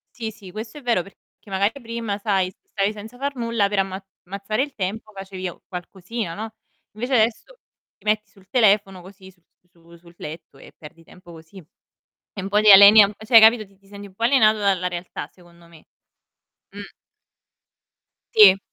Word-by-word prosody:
Sì, 225 -2 -5
sì, 205 -3 -14
questo 215 +8 -8
è - - -14
vero, 235 -7 0
perché 195 - -18 0.3
magari 200 +2 0
prima, 230 -3 -5
sai, 195 -3 0 0.2
stavi 200 +1 0
senza 215 +3 -11
far 280 +1 -3
nulla 230 -4 0
per 205 -1 -3
ammaz 190 0 -4 0.2
ammazzare 200 +6 -3
il 285 -1 -6
tempo 215 +3 -5
facevi 190 -1 -7
a - - -10
qualcosina, 185 +1 -7
no, 220 +1 -7 0.4
invece 245 +5 -3
adesso 240 - 0 0.4
ti - - -30
metti 215 0 0
sul 195 -2 -23
telefono, 205 -5 +2
così 190 +1 -15
su 180 -2 -29 0.3
su 170 0 -20
sul 170 0 -20
letto 160 +2 -10
e - - -16
perdi 165 +2 -15
tempo 180 +1 -17
così. 165 +3 -16 0.8
E 195 - -6
un 190 - -5
po' 210 +1 +2
ti 215 -1 +7
aliena 200 +1 +9
cioè 220 +2 -2
hai 225 - +11
capito, 220 0 +5
ti 195 0 -26
ti 195 0 -27
senti 200 0 -11
un 190 - -20
po' 230 +4 -7
alienato 225 -4 +4
dalla 190 -3 0
realtà, 175 -4 -7
secondo 170 -1 -21
me. 165 -2 -19 0.9
Mh. - - -10 1.4
Sì. 200 -3 +8
200 Hz, 185 wpm, -22 LUFS, 185-220 Hz, 1.4 s, hai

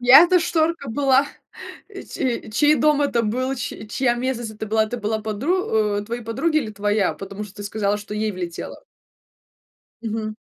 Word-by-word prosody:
чья 250 +4 +9
это 360 +1 +4
шторка 325 -3 0
была? 270 +2 +3 0.6
Че 265 - -4
чей 295 +7 +4
дом 300 -1 +3
это 240 -5 +1
был, 255 +5 -1
чь 225 -3 -6
чья 240 0 +1
местность 240 -2 -2
это 220 0 -6
была, 220 +1 +2
это 240 +3 -5
была 220 0 -1
подру 220 - -1 0.4
о, - - 0
твоей 235 +3 -5
подруги 270 +8 +1
или 240 -8 -3
твоя, 205 -1 +1
потому 200 +1 -7
что 205 -1 -13
ты 205 - -7
сказала, 205 0 0
что 210 0 -7
ей 215 0 0
влетело? 175 -2 -6 1.2
Мгм. 215 -1 -3
230 Hz, 170 wpm, -22 LUFS, 210-270 Hz, 1.2 s, чья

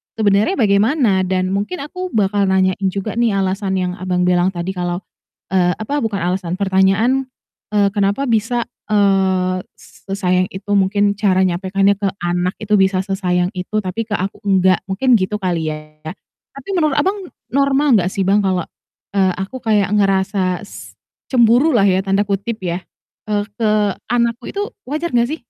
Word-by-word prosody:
sebenarnya 210 - +2
bagaimana? 215 0 +2
Dan 185 0 0
mungkin 205 - -2
aku 365 +5 -5
bakal 200 -1 +2
nanyain 190 0 +1
juga 195 +3 -3
nih, 230 -4 +2
alasan 195 0 -1
yang, 180 -1 -1
Abang, 180 -1 0
bilang 180 +1 +2
tadi 175 +2 -3
kalau, 175 0 -3 0.5
eee, 180 -2 +2
apa 280 +7 -3
bukan 215 -7 -2
alasan, 180 -2 -3
pertanyaan, 200 +7 +2 0.5
eee, 205 -1 +3
kenapa 200 +5 0
bisa, 230 +2 +1 0.2
eee, 190 -3 +2 0.2
s - - -20
sesayang 185 -2 +1
itu, 195 +2 -6
mungkin 200 +1 +2
cara 190 -3 +3
nyampaikannya 190 +2 +1
ke 200 - 0 0.2
anak 175 +1 0
itu 215 0 -2
bisa 190 -1 +2
sesayang 180 -2 0
itu 185 +4 -2
tapi 190 +5 -3
ke 215 - -5
aku 195 +2 -4
enggak 190 -2 +3
mungkin 240 +7 +2
gitu 185 +2 -1
kali 170 -4 -1
ya. 155 - -8 0.7
Tapi 275 +6 -11
menurut, 305 -4 +1
Abang, 390 0 0 0.2
normal 275 -1 +3
enggak 180 0 0
sih, 195 - -1
Bang, 205 +1 +3
kalau, 185 -2 +1 0.5
eee, 190 -2 +3
aku 195 +7 -5
kayak 210 -3 +2
ngerasa 190 -2 +1
s 205 - -11 0.4
"cemburulah" 240 -1 +4
ya 190 0 +1
tanda 195 +1 +2
kutip 205 +3 -3
ya, 180 0 -3 0.4
eee, 205 -1 0
ke 225 -2 +1 0.4
anak 235 -1 +1
ku 240 - -14
itu 405 - -3 0.2
wajar 310 +6 -3
enggak, 240 0 +2
sih? 320 - -7
195 Hz, 165 wpm, -18 LUFS, 185-220 Hz, 0.7 s, cemburulah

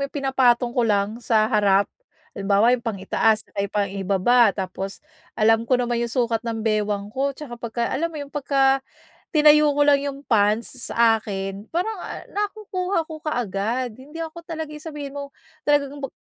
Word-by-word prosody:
yung - - -10
pinapatong 255 -3 +2
ko 245 - +1
lang 210 0 +1
sa 225 -2 +3
harap. 200 -2 +3 0.5
Halimbawa 200 +4 +3
yung 250 - +1
pang-itaas 220 +1 +1
ay 200 -1 -2
pang-ibaba 200 +3 +2
tapos 190 +1 -5 0.3
alam 225 +1 +3
ko 255 - +4
naman 240 -1 -1
yung 235 - -1
sukat 235 -3 +1
ng 225 -1 -4
bewang 210 -1 -1
ko 275 +1 -1
'tsaka 240 -6 -9
pagka 235 0 -3
alam 335 +4 0
mo 325 - -10
'yon, 285 -1 -7
pagka 270 -2 +2 0.5
tinayo 300 -1 +6
ko 290 - +4
lang 285 -1 +5
yung 280 0 -5
pants 225 +3 +1
sa 225 -1 +3
akin 195 0 -5
parang, 360 +7 0
ah, - - -7
nakukuha 400 -4 -2
ko 315 -1 -9
kaagad. 240 - -2
Hindi 300 +5 -7
ako 325 +1 -9
talaga 320 -2 -5
yung 300 +1 -9
sabihin 290 -3 -6
mo 280 0 -5 0.4
talagang 285 -1 +1
mag 275 - -3
240 Hz, 170 wpm, -23 LUFS, 215-290 Hz, 0.5 s, tinayo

